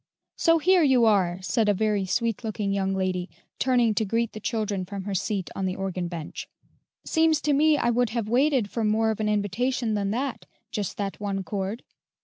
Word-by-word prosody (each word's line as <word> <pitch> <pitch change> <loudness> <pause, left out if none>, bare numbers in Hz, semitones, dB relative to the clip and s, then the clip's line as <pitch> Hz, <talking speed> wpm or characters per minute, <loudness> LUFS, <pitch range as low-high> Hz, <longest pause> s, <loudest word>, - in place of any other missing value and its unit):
"So 330 -1 +4
here 360 +3 +4
you 260 -6 +4
are!" 190 -5 +3
said 215 +2 +1
a 205 - +3
very 210 -1 0
sweet 230 +3 -1
looking 210 -2 -2
young 195 -1 0
lady, 185 -1 -1 0.3
turning 245 -4 +3
to 220 - +1
greet 230 +2 -1
the 215 - -7
children 215 -4 -2
from 195 +1 -6
her 200 +1 -4
seat 195 0 -2
on 190 - -1
the 185 - -2
organ 190 -2 -3
bench. 170 -3 -6 0.6
"Seems 320 -2 +3
to 295 - +1
me 300 +2 +4
I 240 - +1
would 245 0 +1
have 225 -1 -2
waited 255 -1 +2
for 230 - -2
more 220 +1 +2
of 220 - -5
an 215 -1 0
invitation 220 +3 0
than 200 -1 0
that, 255 +4 -3 0.2
just 205 -4 -3
that 200 -1 -3
one 200 -2 -2
chord." 200 +3 -4
215 Hz, 200 wpm, -26 LUFS, 195-245 Hz, 0.6 s, So